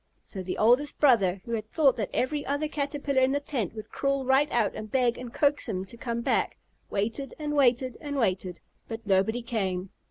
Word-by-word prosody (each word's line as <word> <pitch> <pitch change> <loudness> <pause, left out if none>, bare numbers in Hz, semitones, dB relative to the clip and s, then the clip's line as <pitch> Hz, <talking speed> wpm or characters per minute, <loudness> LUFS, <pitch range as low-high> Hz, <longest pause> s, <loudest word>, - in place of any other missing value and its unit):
So 190 - -7
the 185 0 -4
oldest 250 +7 +3
brother, 200 -10 +4
who 235 - -7
had 215 -2 -3
thought 280 -3 +4
that 210 -4 -2
every 285 +3 -1
other 285 +2 -1
Caterpillar 285 -2 -1
in 260 +1 +3
the 285 - +1
tent 250 - -3
would 215 - -8
crawl 275 -1 0
right 270 +3 +3
out 225 -4 +1
and 215 -1 -7
beg 250 -2 +2
and 250 -2 -7
coax 290 -1 +1
him 190 -3 -2
to 195 - -10
come 235 0 -3
back, - - 0 0.3
waited 225 +7 -2
and 300 -1 -3
waited 255 -2 +3
and 290 -2 -4
waited, 185 -7 -1 0.3
but 225 -1 -7
nobody 205 +4 +2
came. 190 -5 -2
240 Hz, 200 wpm, -27 LUFS, 215-280 Hz, 0.3 s, brother